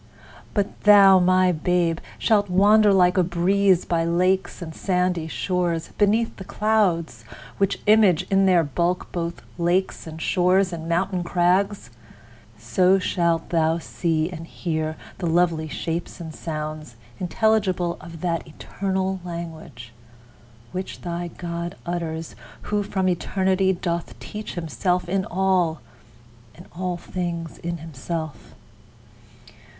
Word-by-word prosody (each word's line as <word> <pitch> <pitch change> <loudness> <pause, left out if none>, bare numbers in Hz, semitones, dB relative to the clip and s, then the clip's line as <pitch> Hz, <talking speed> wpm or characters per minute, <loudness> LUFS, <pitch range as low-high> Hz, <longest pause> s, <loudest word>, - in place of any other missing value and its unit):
But 205 -1 -1
thou, 200 -2 +8
my 185 0 +4
babe! 170 0 +1 0.2
shalt 205 -3 +2
wander 205 +3 +5
like 180 -1 +4
a - - +5
breeze 185 +2 +2
By 165 -1 0
lakes 185 +3 +1
and 165 -3 -7
sandy 180 -2 0
shores, 175 -1 -1
beneath 215 +3 +2
the 195 - -7
clouds, 185 - 0 0.4
Which 195 -1 +1
image 205 -5 +5
in 195 0 +4
their 180 -3 +5
bulk 170 +5 -1
both 170 -1 -4 0.2
lakes 175 +1 0
and 160 0 -8
shores 185 +2 +2
And 165 0 -6
mountain 180 +1 0
crags: 180 - +1 0.7
so 180 - +3
shalt 170 -3 0
thou 165 -1 +2
see 165 -1 -1
and 165 -1 -8
hear 155 -3 -3 0.2
The 175 - -2
lovely 165 -1 +2
shapes 165 +4 -4
and 160 -2 -7
sounds 155 -5 -6 0.2
intelligible 185 -2 +1
Of 165 -1 -10
that 170 -2 -2
eternal 190 +4 -3
language, 160 -9 -8 0.8
which 185 +1 -6
thy 175 0 -4
God 170 +1 -5
Utters, 165 -2 -4 0.3
who 210 0 -1
from 190 -2 -1
eternity, 190 +1 +1
doth 170 -2 -3
teach 210 0 -7
Himself 180 +1 -1
in 190 +1 0
all, 185 -3 +1 0.8
and 175 - -13
all 180 0 -2
things 170 -2 -5
in 170 0 -4
himself. 160 0 -6
175 Hz, 125 wpm, -23 LUFS, 165-190 Hz, 0.8 s, thou